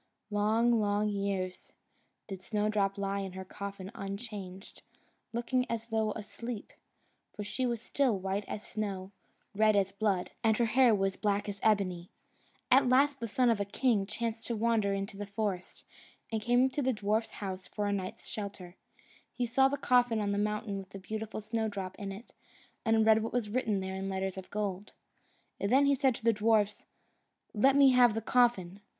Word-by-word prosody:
Long, 220 +3 +3
long 205 0 +1
years, 195 -2 -3 0.5
did 190 -2 -7
Snowdrop 210 -1 0
lie 200 0 -1
in 190 -2 -5
her 190 0 -7
coffin 195 0 -7
unchanged, 195 -2 -7 0.5
looking 240 +2 0
as 230 -1 -2
though 220 -1 +1
asleep, 225 +1 -7 0.6
for 210 - -4
she 215 +6 -2
was 235 -2 -2
still 260 -7 +1
white 195 +2 -2
as 215 - -5
snow, 195 -3 -4 0.4
red 215 +1 +4
as 195 -1 +2
blood, 200 -3 0
and 220 -1 +3
her 235 - +3
hair 240 0 +5
was 195 -1 0
black 205 -1 0
as 205 -1 -5
ebony. 185 -5 +1 0.6
At 260 0 +6
last 275 +2 +4
the 230 - -3
son 245 +2 +3
of 225 - 0
a - - +1
king 205 0 +1
chanced 230 +1 -3
to 235 - -1
wander 220 -2 +1
into 195 0 -3
the 205 0 -5
forest, 200 -3 -4 0.5
and 220 -1 -1
came 245 +3 +4
to 290 - -1
the 260 -1 +1
dwarf's 215 +2 -1
house 190 -2 -5
for 210 - -3
a 205 - 0
night's 190 -2 -4
shelter. 195 -4 -6 0.6
He 245 - -2
saw 265 +3 +4
the 285 +1 -2
coffin 245 -4 +3
on 205 -1 0
the 200 - 0
mountain 210 -1 -1
with 190 -1 -10
the 195 - -9
beautiful 215 +3 -5
Snowdrop 210 -3 -3
in 200 -1 -4
it, 200 +5 -10 0.5
and 225 -1 +3
read 220 0 +5
what 225 - -4
was 230 -4 -1
written 220 -5 0
there 190 0 -4
in 195 0 -3
letters 190 0 -2
of 190 -1 -8
gold. 205 -1 -3 0.7
Then 260 +8 +4
he 280 - +4
said 265 -2 +2
to - - -10
the 230 0 +4
dwarfs, 210 -1 +1 0.7
"Let 265 +6 +4
me 280 -1 +7
have 245 -3 +5
the 225 - -1
coffin! 225 -6 +2
210 Hz, 180 wpm, -31 LUFS, 195-230 Hz, 0.7 s, me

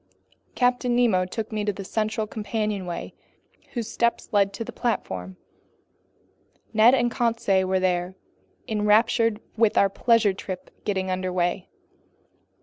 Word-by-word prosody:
Captain 245 -1 +2
Nemo 220 -7 +3
took 215 +4 -5
me 215 -1 -2
to 205 - +1
the 195 0 -7
central 220 +2 -1
companionway 210 -4 -3 0.6
whose 235 -4 -3
steps 235 +1 -1
led 200 -1 +3
to 200 - -5
the - - -8
platform. 95 - -3 1.4
Ned 225 +4 +6
and 240 -2 +1
Conseil 230 -6 +1
were 190 0 +1
there, 180 0 0 0.5
enraptured 220 +1 +2 0.2
with 225 -2 +4
the 200 - +4
"pleasure 225 0 +3
trip" 185 -1 -7
getting 190 -2 -1
under 185 0 -2
way. 175 0 -1
210 Hz, 130 wpm, -25 LUFS, 185-230 Hz, 1.4 s, Ned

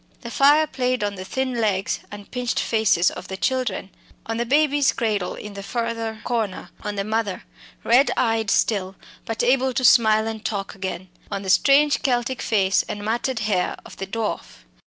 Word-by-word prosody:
The 235 - -7
fire 290 +4 +5
played 255 -5 -1
on 205 0 -1
the 185 -2 -7
thin 255 +3 -2
legs 195 -3 0
and 205 -1 -11
pinched 250 -1 -1
faces 220 -6 +2
of - - -9
the 190 - -6
children; 255 -5 -1 0.3
on 225 0 -3
the 235 0 -1
baby's 290 0 +3
cradle 210 -5 -1
in 210 -1 -8
the 200 - -7
further 230 0 -3
corner; 225 -6 -2
on 210 - -3
the 200 - -1
mother, 215 -2 -2 0.4
red 250 +5 +4
eyed 225 -3 +1
still, 195 -3 +1 0.3
but 225 0 -2
able 260 +1 +2
to 255 +1 0
smile 220 -2 +5
and 225 -1 -5
talk 195 -2 -3
again; 185 -1 -5 0.2
on 200 -1 -4
the 190 - +1
strange 285 +7 +4
Celtic 250 -1 0
face 195 -3 +2
and 205 -1 -5
matted 240 +2 -1
hair 200 -4 0
of - - -12
the 195 - -5
dwarf. 215 - -4
225 Hz, 180 wpm, -23 LUFS, 200-250 Hz, 0.4 s, fire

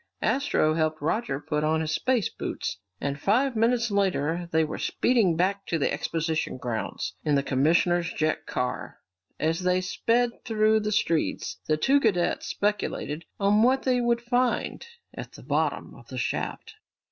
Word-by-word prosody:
Astro 265 - +2
helped 155 -1 0
Roger 165 - -1
put 150 0 -2
on 160 +1 +2
his 155 -1 -2
space 245 +6 +1
boots, - - -5 0.2
and 140 0 -3
five 245 - +2
minutes 235 +1 +2
later 175 -4 0
they 160 0 +3
were 155 - -4
speeding 225 -9 +2
back 195 +4 0
to 165 - 0
the 145 - 0
exposition 160 -3 -2
grounds 120 -3 -3
in 150 -2 +2
the 140 - +2
commissioner's 165 +5 +2
jet 155 0 -1
car. 125 0 -3 0.4
As 165 +3 0
they 180 0 +2
sped 235 +6 0
through 220 -1 +3
the 210 0 -2
streets, 170 -6 0
the 155 - +2
two 270 - +4
cadets 200 -9 +1
speculated 195 -6 -2
on 205 +1 +4
what 260 +3 +3
they 250 -1 +2
would 235 0 +1
find 245 - 0 0.3
at - - -8
the - - -12
bottom - - -1
of - - -15
the - - -7
shaft. 435 - -3
180 Hz, 160 wpm, -26 LUFS, 155-230 Hz, 0.4 s, two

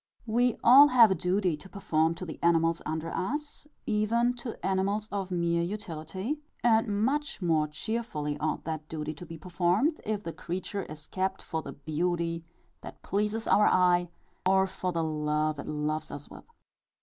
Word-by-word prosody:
We 240 +1 +2
all 270 +5 +9
have 240 -6 +7
a - - +5
duty 180 0 +1
to 190 +6 -12
perform 165 -5 +1
to 185 - -6
the 155 - -8
animals 165 0 +3
under 160 +1 -3
us, 295 +7 -4 0.2
even 230 +1 +2
to 235 -1 -6
animals 195 +3 0
of 195 -2 -3
mere 170 -1 +1
utility; 190 - -4 0.2
and 220 -3 +3
much 295 +4 -1
more 160 -5 +2
cheerfully 150 -3 -3
ought 155 +1 -1
that 155 -1 -5
duty 155 -1 -4
to 175 +3 -10
be 165 0 -8
performed, 180 - +1
if 210 -1 -2
the 165 - -5
creature 185 +3 -4
is 150 0 -10
kept 190 +2 -2
for 160 -1 -3
the 140 - -8
beauty 165 +3 -2 0.4
that - - -11
pleases 210 +3 -1
our 210 - +5
eye, 180 -1 +3 0.3
or 190 +1 +4
for 185 -1 -3
the 165 -1 -1
love 150 -1 0
it - - -6
loves 155 +1 -2
us 145 0 -8
with. - - -12
180 Hz, 170 wpm, -29 LUFS, 160-210 Hz, 0.4 s, all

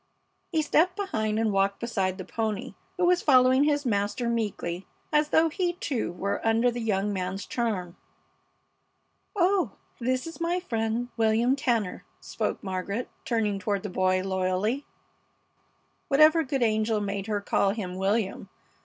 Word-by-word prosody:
He 320 -3 +1
stepped 350 +4 +3
behind 220 - -1
and 220 -1 +1
walked 195 0 +1
beside 195 -6 -1
the 185 - -6
pony, 220 -3 -3 0.2
who 360 - +2
was 355 0 +4
following 260 0 +5
his 290 -1 +1
master 205 +2 0
meekly, 205 -6 -2 0.3
as 300 0 +3
though 320 +2 +4
he, 350 +1 -1
too, 270 - -2
were 200 +3 -2
under 225 +2 +3
the 240 0 -4
young 205 -2 0
man's 190 +1 -3
charm. 200 -8 -2 1.4
"Oh, 380 0 +2 0.3
and 240 - -4
this 255 0 +1
is 330 +1 -8
my 345 +2 +1
friend, 230 -6 -2
William 225 +3 +3
Tanner," 235 -8 -1 0.2
spoke - - -3
Margaret, 195 +4 -3 0.2
turning 215 -4 0
toward 200 0 -1
the 205 - -4
boy 185 0 +1
loyally, 190 +7 -1 1.2
(Whatever 310 +3 +5
good 270 -2 -1
angel 220 -1 +1
made 200 -1 -3
her 210 -1 0
call 200 0 +1
him 195 -3 -3
William? 195 +1 -1
225 Hz, 150 wpm, -27 LUFS, 200-270 Hz, 1.4 s, following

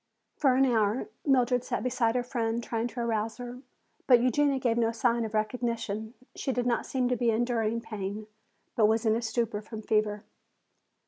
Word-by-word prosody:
For 270 -4 +3
an 270 +1 +5
hour 225 -1 +1 0.2
Mildred 250 -2 +3
sat - - -3
beside 245 -2 +1
her 250 - +1
friend 235 -2 -2
trying 230 0 -2
to 245 0 -5
arouse 225 -1 -1
her. 245 0 -7 0.5
But 245 -2 +7
Eugenia 270 +3 +2
gave 245 -3 +1
no 230 -1 +2
sign 235 0 +1
of 220 0 -5
recognition. 220 0 -2 0.2
She 270 - -2
did 245 -1 -1
not 240 -1 0
seem 255 -2 0
to 250 - +2
be 240 0 +1
enduring 230 0 0
pain, 210 -1 -5 0.5
but 215 -2 +5
was 220 +1 +1
in 220 0 +4
a 230 - -1
stupor 230 -2 -1
from 215 0 -8
fever. 210 -1 0
235 Hz, 185 wpm, -29 LUFS, 220-245 Hz, 0.5 s, But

